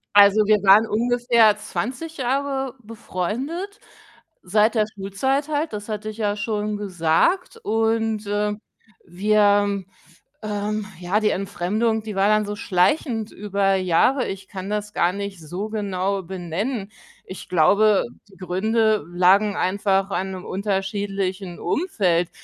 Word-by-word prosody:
Also 205 +1 +7
wir 215 0 +5
waren 200 +3 +7
ungefähr 235 -1 +3
20 255 +9 -5
Jahre 270 0 -1
befreundet, 250 - -4 0.6
seit 210 +5 +2
der 215 -1 +3
Schulzeit 265 +9 -1
halt, 305 -1 -1
das 210 0 -6
hatte 215 0 -4
ich 215 - -9
ja 205 -2 0
schon 210 0 -2
gesagt 195 - +1
und, 225 - 0
äh, 210 0 0 0.5
wir 205 +1 +2 0.6
ähm, 210 0 -2
ja, 185 +4 0
die 215 - +3
Entfremdung, 210 +4 -1
die 215 -2 -6
war 195 - +3
dann 215 0 +3
so 205 0 -4
schleichend 220 - 0
über 200 -1 0
Jahre. 190 +9 +2
Ich 195 0 -7
kann 190 0 -6
das 210 0 -3
gar 175 +1 +2
nicht 200 -2 -5
so 180 +7 -5
genau 195 -2 -2
benennen. 190 +5 -4 0.3
Ich 185 - -9
glaube, 200 +5 +4 0.3
die 195 - -18
Gründe 215 +2 +1
lagen 185 +4 +3
einfach 195 0 +1
an 190 +1 -2
'nem 185 -1 -7
unterschiedlichen 195 -1 -3
Umfeld. 185 - 0
205 Hz, 130 wpm, -22 LUFS, 195-220 Hz, 0.6 s, Also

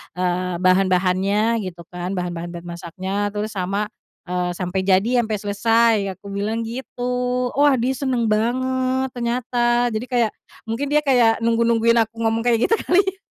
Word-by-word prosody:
eee, 180 0 -1
bahan-bahannya 190 +4 +2
gitu 170 -2 -8
kan, 180 +1 -4
bahan-bahan 175 -1 -4
dan 170 - -8
masaknya. 185 +4 -4
Terus 215 +1 -2
sama, 195 +3 -1 0.4
eee, 180 0 -1
sampai 180 +1 -2
jadi 215 +7 +3
sampai 215 -1 -2
selesai, 225 +3 +3 0.2
aku 200 +2 -14
bilang 215 +3 -2
gitu. 250 +1 -2
Wah 290 -2 +5
dia 250 +3 +1
seneng 255 -4 -1
banget 260 +3 0
ternyata, 240 0 0
jadi 220 +3 -3
kayak 235 -3 +2 0.4
mungkin 240 +6 -2
dia 300 0 +4
kayak 245 -5 +4
nunggu-nungguin 230 0 +3
aku 225 +1 -14
ngomong 225 0 +1
kayak 235 -1 +3
gitu - - +6
kali 385 +2 +5
ya. 385 0 -4
225 Hz, 155 wpm, -21 LUFS, 190-245 Hz, 0.4 s, gitu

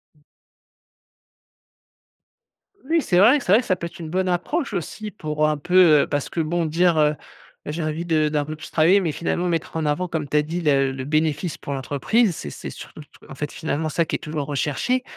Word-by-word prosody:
Mmh. - - -28 2.6
Oui, 325 +4 +1
c'est 180 - +1
vrai, 230 +10 +6
c'est 215 - -2
vrai 215 +5 +6
que - - -12
ça 185 - +2
peut 170 -1 -5
être 170 - -14
une 160 -2 -6
bonne 185 +3 0
approche 230 - -1
aussi 200 +4 -4
pour 155 -6 -1
un 150 - -1
peu, 175 -1 +5
heu - - -1
parce 145 -1 -2
que - - -4
bon 165 +2 0
dire, 165 +2 +2
heu, 150 0 +3 0.5
j'ai 155 +3 -4
envie 155 +2 -3
de 155 -3 +2
d'un 150 -1 -1
peu 155 +1 -6
plus 155 - -10
travailler, 170 +5 +4
mais 175 -5 -1
finalement 170 +3 -2
mettre 165 -2 -2
en 160 - -1
avant, 150 +5 0
comme 160 -4 -3
tu 150 - +1
as - - +5
dit: 165 +4 -4
«La 135 -4 +2
le 130 0 -5
bénéfice 155 +3 -1
pour 140 - -6
l'entreprise» 150 - +1
c'est 75 - -6
c'est - - -7
surtout, - - -10
t 150 - -15 0.2
en - - -8
fait, 145 +1 -4
finalement 155 0 -2
ça 165 +3 0
qui - - -3
est - - -29
toujours 150 -2 -4
recherché. 150 - -1
160 Hz, 220 wpm, -22 LUFS, 150-180 Hz, 2.6 s, vrai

